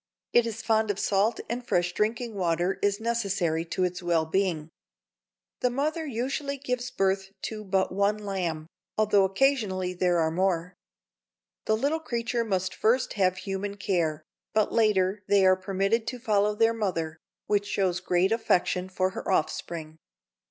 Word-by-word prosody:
It 240 -1 +5
is 225 0 -5
fond 220 -1 +2
of 205 - 0
salt 210 +3 +1
and 245 +1 -3
fresh 175 -6 0
drinking 225 +3 -1
water 180 0 0
is 205 0 +1
necessary 200 -8 0
to 185 +2 -2
its 180 0 -1
well 170 -2 +1
being." 165 -2 -1 0.9
The 250 - +2
mother 305 +5 -1
usually 275 +3 -2
gives 250 -2 -3
birth 195 0 0
to 215 -1 -4
but 190 -1 0
one 200 +2 +1
lamb, 185 -6 -3 0.3
although 210 -2 +4
occasionally 195 -5 +1
there 180 -1 +1
are 160 -1 +2
more. 180 0 0 0.9
The 220 - +2
little 290 +7 0
creature 235 -4 -2
must 190 -4 -1
first 235 +4 +1
have 185 -3 +2
human 200 +1 -4
care, 165 -6 0 0.3
but 215 -1 +2
later 210 -3 +2
they 200 -1 +4
are 185 0 +6
permitted 195 +4 0
to 250 - -3
follow 210 -3 +2
their 225 +1 +3
mother, 165 -7 -2 0.3
which 205 -1 +1
shows 190 -3 0
great 185 +1 +1
affection 185 -4 +1
for 185 0 0
her 195 - -4
offspring. 160 -2 -2
195 Hz, 155 wpm, -27 LUFS, 180-225 Hz, 0.9 s, are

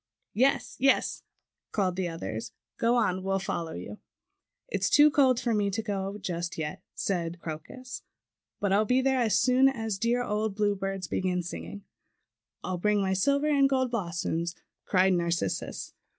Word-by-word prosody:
"Yes, 260 +5 +1
yes;" 270 +1 +2 0.5
called 185 -4 0
the 185 -1 -1
others, 110 - -5 0.3
"go 235 +1 +3
on! 190 -6 +1
We'll 195 +1 0
follow 170 -4 -3
you." 210 - -7 0.7
"It's - - 0
too 295 +1 +7
cold 260 -4 +4
for 235 -2 0
me 205 -2 +1
to 220 +3 -2
go 200 -1 -3
just 175 -3 -4
yet," 160 +4 -4
said 175 -3 -2
Crocus, 170 +12 -7 0.6
"but 200 -1 +1
I'll 205 +2 +4
be 250 +4 +2
there 265 0 +2
as 225 -3 +3
soon 260 +1 +5
as 225 -6 -3
dear 240 +3 +1
old 210 -2 -1
Bluebird 195 -3 -1
begins 180 -2 -1
singing." 85 +5 -7 0.8
"I'll 185 -1 -3
bring 210 +2 +2
my 190 -1 +1
silver 280 +9 +2
and 280 -2 +4
gold 260 -2 +1
blossoms," 170 -4 -2 0.3
cried 190 0 +3
Narcissus. 170 - -2
195 Hz, 155 wpm, -28 LUFS, 175-240 Hz, 0.8 s, too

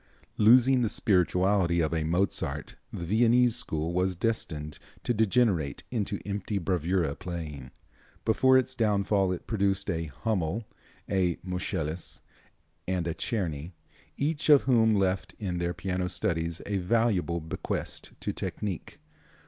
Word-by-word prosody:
Losing 125 +4 +6
the 115 - +1
spirituality 90 -3 +2
of 80 -1 +1
a 80 -1 0
Mozart 80 -4 -1 0.2
the 85 - -5
Viennese 120 +4 +4
school 80 -7 -1
was 90 +1 +1
destined 85 -8 -2 0.2
to 120 - +1
degenerate 105 - +1
into 105 -4 -2
empty 100 +1 -3
bravura 90 -4 0
playing. 80 -7 -6 0.6
Before 130 +4 +5
its 130 0 0
downfall 100 -4 +2
it 90 - -4
produced 100 -2 0
a 85 -1 -2
Hummel, 95 - -2 0.4
a 90 -3 +1
Moscheles 90 -3 -3 0.7
and 90 -2 -1
a 85 - -1
Czerny, 85 -7 -3 0.4
each 150 +1 -1
of 145 -2 +8
whom 115 -4 +4
left 95 -1 0
in 90 -5 -3
their 85 0 -1
piano 90 -1 -2
studies 85 -1 -1
a 100 -1 -1
valuable 95 -3 +1
bequest 80 0 -4
to - - -2
technique. 100 -5 -4
95 Hz, 130 wpm, -28 LUFS, 85-110 Hz, 0.7 s, of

